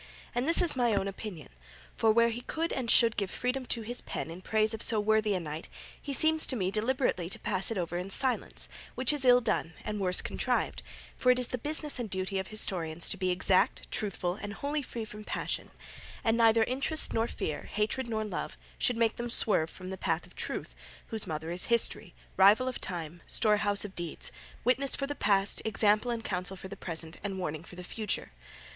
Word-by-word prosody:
And 245 +3 -1
this 335 +2 +5
is 340 - +4
my 240 -4 +2
own 195 0 0
opinion; 195 -5 -7 0.5
for, 225 - +4
where 235 +1 +4
he 230 +1 -4
could 325 +6 -2
and 250 -3 -3
should 230 -1 +5
give 200 -2 0
freedom 250 +3 -2
to 230 - -1
his 240 +3 -1
pen 165 - -5
in 175 +2 -9
praise 215 +2 +2
of 220 - -5
so 220 -2 +3
worthy 215 -1 +2
a - - 0
knight, 155 -1 -6 0.3
he 285 - -5
seems 315 +3 +4
to 260 - -2
me 190 -5 0
deliberately 215 -5 0
to - - -3
pass 190 -1 0
it 225 - -3
over 175 -1 -2
in 185 +2 -5
silence; 260 +5 -1 0.3
which 255 +3 +2
is 285 -3 +2
ill 250 0 +7
done 170 -7 -1
and 210 -1 -3
worse 185 -2 +1
contrived, - - -1 0.3
for 250 - +4
it 250 - +3
is 250 -1 -1
the 250 - -3
business 300 +1 +1
and 235 -3 -3
duty 190 +1 -2
of 190 - -4
historians 175 -6 0
to 195 - -2
be 185 -1 0
exact, 180 +1 +2
truthful, 185 -4 -2
and 205 +1 -6
wholly 290 +5 -2
free 235 -4 -6
from 210 0 -9
passion, - - -3 0.5
and 225 0 +3
neither 225 -1 +5
interest 270 +6 +1
nor 225 +1 +1
fear, 155 - -4
hatred 220 +4 -1
nor 220 -1 -1
love, 210 - -4 0.2
should 245 - +2
make 230 -1 +2
them 240 0 -3
swerve 200 -8 +4
from 185 +2 -9
the 190 - -6
path 165 -3 -1
of - - -19
truth, - - -4 0.4
whose 220 -2 -1
mother 160 +1 -4
is 175 +1 +1
history, 235 -6 +1 0.2
rival 205 +7 +6
of 255 - -4
time, 170 -2 -5
storehouse 205 -2 +2
of 195 - -9
deeds, 170 -2 -4 0.3
witness 260 +3 +3
for 275 - -2
the 290 - -3
past, 200 -6 +2
example 215 +2 +2
and 230 -2 -3
counsel 185 0 -2
for 190 - -8
the 200 - -7
present, 165 -3 -2
and 195 -2 -3
warning 155 -4 -3
for 175 - -12
the 180 - -8
future. 215 +4 -3
215 Hz, 215 wpm, -30 LUFS, 185-240 Hz, 0.5 s, ill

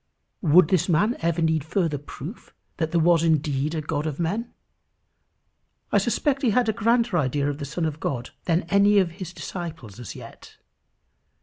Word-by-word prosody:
Would 170 0 +5
this 185 -1 +2
man 205 +9 +2
ever 170 0 0
need 160 -2 +1
further 160 -2 -1
proof 145 - -10 0.2
that 160 -2 -1
there 170 - +2
was 165 0 +4
indeed 155 -2 +1
a 155 - -1
God 150 +1 -2
of 150 -1 -4
men? 205 +8 -2 1.4
I - - +4
suspect 280 -3 0
he 250 - +2
had 240 +2 +2
a 220 - +2
grander 230 -3 +2
idea 140 0 0
of 145 0 -3
the 145 - -4
Son 155 +4 -3
of 155 -1 -3
God 125 -5 -3
than 170 0 +1
any 200 +4 +4
of 185 -4 +3
his 175 0 -8
disciples 160 - -7
as 120 - -8
yet. - - -12
165 Hz, 180 wpm, -24 LUFS, 150-195 Hz, 1.4 s, Would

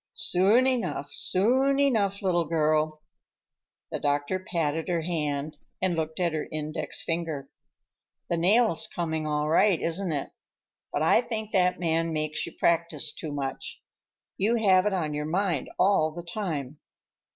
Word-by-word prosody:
"Soon 200 +8 +4
enough, 240 - -1
soon 260 +8 +3
enough, 210 -8 +1
little 175 -3 +2
girl." 155 -1 0 0.9
The - - -3
doctor 145 +5 0
patted 165 -4 -2
her 175 -2 0
hand 150 -3 -2 0.2
and 185 -2 0
looked 160 0 -3
at 170 -2 +1
her 155 - -3
index 155 0 -3
finger. 165 -5 -3 0.8
"The 170 - 0
nail's 200 +2 +4
coming 160 -2 -3
all 150 0 0
right, 170 +3 +4
isn't 170 +2 -1
it? 145 -3 -3 0.6
But 145 - -1
I 165 - +5
think 220 -3 -5
that 180 -3 +2
man 165 -1 0
makes 155 -1 -1
you - - -7
practice 165 -3 0
too 155 - -6
much. 140 -2 -5 0.5
You 220 +5 +2
have 195 -4 +4
it 210 - 0
on 160 -5 -1
your 150 0 -3
mind 175 -4 -1
all 185 -5 +3
the 170 +2 -8
time." 155 -7 -4
165 Hz, 150 wpm, -27 LUFS, 155-190 Hz, 0.9 s, I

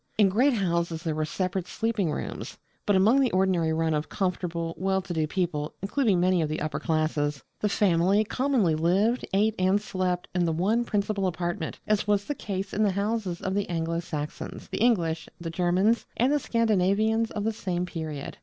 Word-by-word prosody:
In 205 -3 +5
great 255 +9 +3
houses 170 -5 -1
there 160 -3 -1
were 155 0 -1
separate 185 +2 -2
sleeping 225 -6 -1
rooms. - - -5 0.3
But 205 - +4
among 215 +8 +5
the 265 -2 +3
ordinary 185 -4 +2
run 160 0 +1
of 150 0 -2
comfortable, 175 -3 -2
well 190 +1 0
to 185 -2 -5
do 160 -2 0
people, 155 -4 -2
including 205 -3 +2
many 180 0 +3
of 155 - -1
the 155 - -2
upper 155 0 -2
classes, 155 -3 0 0.2
the 210 - +1
family 195 +1 +3
commonly 250 - +1
lived, 190 +10 +1
ate, 210 +3 +3
and 185 +2 +3
slept 185 -3 -2
in 180 -1 +1
the 165 - +1
one 210 +9 +1
principal 200 -2 0
apartment, 175 -2 -3
as 210 -1 +1
was 205 -1 +2
the 290 - -2
case 195 -6 -5
in 215 - 0
the 205 -3 +3
houses 200 -3 -2
of 190 - -2
the 200 0 -1
Anglo 165 -1 -1
Saxons, 150 -3 -6
the - - -3
English, 170 -9 +1
the 165 -1 -5
Germans, 185 +6 +2
and 255 +5 +3
the 295 - +3
Scandinavians 220 -1 +2
of 210 - -4
the 225 +1 0
same 180 -4 -2
period. 155 -5 -6
185 Hz, 190 wpm, -27 LUFS, 165-210 Hz, 0.3 s, In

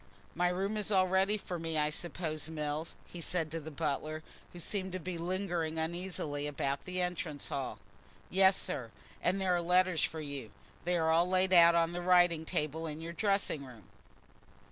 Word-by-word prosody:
"My 180 +1 +2
room 195 +4 -1
is 210 0 -1
all 190 -2 +5
ready 190 +3 +3
for 180 -4 -5
me, 165 -1 -2
I 150 0 +2
suppose, 160 -2 -3
Mills?" 155 0 -3
he 175 - -9
said 165 -2 -1
to 165 - -2
the 160 0 -7
butler, 155 +1 -2 0.3
who 175 - -10
seemed 190 +2 -2
to 185 - -2
be 175 0 -5
lingering 175 -2 -1
uneasily 160 -3 -2
about 140 -1 -2
the 185 0 -3
entrance 175 -5 -2
hall. 135 -2 -3 0.5
"Yes, 190 +1 +5
sir, 120 -3 -3 0.3
and 185 +3 +1
there 190 -1 +2
are 175 - +2
letters 180 -1 +3
for 160 - -1
you; 140 -6 -6 0.4
they 175 0 +2
are 160 -1 +2
all 170 +2 +4
laid 185 0 +2
on 170 -1 +7
the 175 0 -3
writing 175 -2 +4
table 155 +1 -1
in 155 0 -5
your 165 +1 -6
dressing 195 -7 0
room." 125 -5 -12
170 Hz, 185 wpm, -33 LUFS, 155-185 Hz, 0.5 s, on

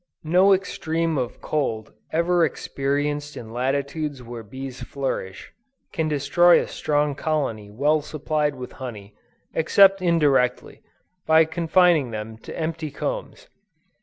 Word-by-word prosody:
No 180 +5 +5
extreme 165 -4 0
of 125 -2 -4
cold 115 -8 -2 0.2
ever 170 +1 +2
experienced 145 0 -2
in 110 -1 -9
latitudes 140 +2 -2
where 120 0 -8
bees 130 +4 -8
flourish, 130 -9 -4 0.4
can 160 -3 0
destroy 155 +4 +4
a - - -2
strong 145 -1 0
colony 135 -9 -2
well 145 +8 +1
supplied 150 0 -1
with 125 -1 -8
honey, 105 -5 -7 0.4
except 195 +4 +5
indirectly, 150 -8 +1 0.5
by 160 0 +6
confining 165 -3 +3
them 110 0 -6
to - - -9
empty 160 -1 -3
combs. - - -5
150 Hz, 120 wpm, -23 LUFS, 130-165 Hz, 0.5 s, by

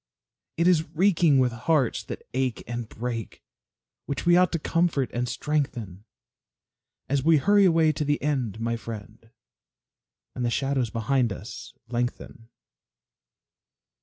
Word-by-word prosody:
It 170 +1 +3
is 165 -3 +3
reeking 170 -5 +4
with 130 -2 +3
hearts 130 +2 +1
that - - -8
ache 130 -2 -1
and 120 -1 -5
break, 115 -2 -5 0.6
Which 140 +2 -3
we 175 0 +6
ought 180 0 +4
to - - +2
comfort 165 -4 0
and 120 0 -1
strengthen, 120 - -3 1.0
As 135 0 0
we 160 +1 +5
hurry 200 +6 +4
away 165 -3 +4
to 155 +1 -3
the 145 0 0
end, 130 -8 -2
my 115 0 -1
friend, 110 0 -9 1.0
And 125 - -4
the 120 - +1
shadows 135 -1 0
behind 120 +1 0
us 100 +2 -8
lengthen. 120 -1 -4
130 Hz, 135 wpm, -26 LUFS, 115-155 Hz, 1.0 s, we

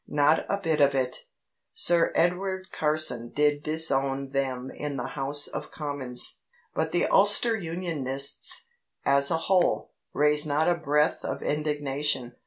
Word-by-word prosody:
Not 145 +2 +2
a 200 - +1
bit 160 -6 0
of 140 -1 +4
it. 130 -1 -2 0.5
Sir 170 -1 +2
Edward 185 +2 0
Carson 150 -6 +1
did 145 +1 +1
disown 140 -3 0
them 130 -2 -2
in 145 -2 -5
the 125 +1 -4
House 145 +1 0
of - - -6
Commons. 140 -5 -2 0.3
But 160 0 -1
the 175 - +1
Ulster 205 +4 +4
Unionists, 160 - -1 0.4
as 140 0 +5
a 165 - +1
whole, 180 +2 +1 0.2
raised 150 +1 +2
not 150 +2 +1
a 175 - +4
breath 150 -3 0
of - - -4
indignation. 145 -4 -2
150 Hz, 140 wpm, -26 LUFS, 135-165 Hz, 0.5 s, as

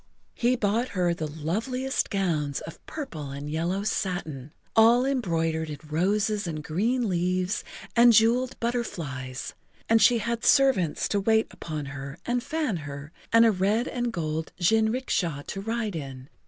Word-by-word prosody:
He 245 +1 +2
bought 230 +2 0
her 175 -1 +2
the 160 -2 -3
loveliest 225 - -2
gowns 160 -8 0
of 165 - -10
purple 160 - -6
and 140 +1 -6
yellow 170 +6 -1
satin, 160 -9 -3 0.2
all 235 +3 +6
embroidered 165 - 0
in 150 - -5
roses 205 +5 0
and 155 -2 -4
green 225 +10 0
leaves 185 +1 0 0.3
and 240 0 +7
jeweled 235 +3 +3
butterflies, 150 - -3 0.3
and 225 0 +4
she 235 +4 +6
had 230 +1 -2
servants 260 - +3
to 205 - +1
wait 220 +2 +3
upon 155 -3 -5
her 140 +2 -7
and 245 0 0
fan 295 - -1
her 145 -1 -8 0.2
and 230 0 +7
a 225 - +6
red 205 +5 +1
and 245 -1 -2
gold 160 -3 -3
jinricksha 220 - +1
to 195 - -5
ride 220 -2 -2
in. 135 -3 -7
195 Hz, 150 wpm, -26 LUFS, 155-230 Hz, 0.3 s, and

